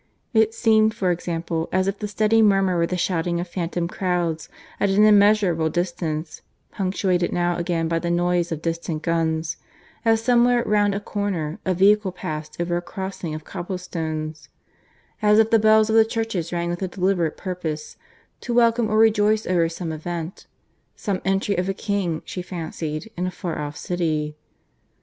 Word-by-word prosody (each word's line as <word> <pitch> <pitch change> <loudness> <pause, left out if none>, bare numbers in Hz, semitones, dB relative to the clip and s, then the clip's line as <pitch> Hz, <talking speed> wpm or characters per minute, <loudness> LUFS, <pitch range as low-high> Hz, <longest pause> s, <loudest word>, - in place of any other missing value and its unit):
It 220 0 +3
seemed, 220 -1 +3
for 185 -2 +1
example, 165 -1 -3
as 185 +1 +1
if 195 +1 -2
the 210 - -3
steady 215 +2 +2
murmur 195 -3 +3
were 170 -1 +2
the 180 - -2
shouting 170 -1 0
of 175 - -3
phantom 175 -1 -2
crowds 175 -3 -2 0.3
at 200 - +2
an 195 +2 +4
immeasurable 205 -6 +4
distance, 170 -2 -3 0.3
punctuated 185 -2 0
now 175 0 +1
again 170 -1 -1
by 165 0 0
the 170 - -3
noise 175 0 +1
of 160 -1 -4
distant 165 -1 -3
guns, 165 -1 0 0.5
as, 225 -1 +3
somewhere 240 +1 +3
round 205 -1 +2
a - - -1
corner 195 -7 -3
a 185 - +1
vehicle 200 +1 +4
passed 155 -3 -6
over 175 0 0
a - - -2
crossing 190 -3 -5
of 155 - -7
cobble 180 +4 -5
stones; 160 -3 -5 0.7
as 210 0 +5
if 220 0 +4
the 225 - +6
bells 215 0 +5
of 220 - +1
the 225 - +8
churches 225 -7 -3
rang 170 0 -1
with 175 - -4
a 190 - 0
deliberate 180 -3 0
purpose, 165 -5 -5 0.4
to 240 - -3
welcome 235 -1 +3
or 215 - +1
rejoice 215 -1 +4
over 170 -2 +2
some 165 0 -5
event... 165 +2 -6 0.5
some 195 -3 -3
entry 195 +1 +1
of 180 +1 -1
a 195 - -1
king, 195 -7 -2
she 180 - -5
fancied, 165 0 -5
in 180 +1 -2
a - - 0
far 180 -3 -5
off 145 0 -5
city. 155 -4 -2
180 Hz, 175 wpm, -23 LUFS, 165-205 Hz, 0.7 s, the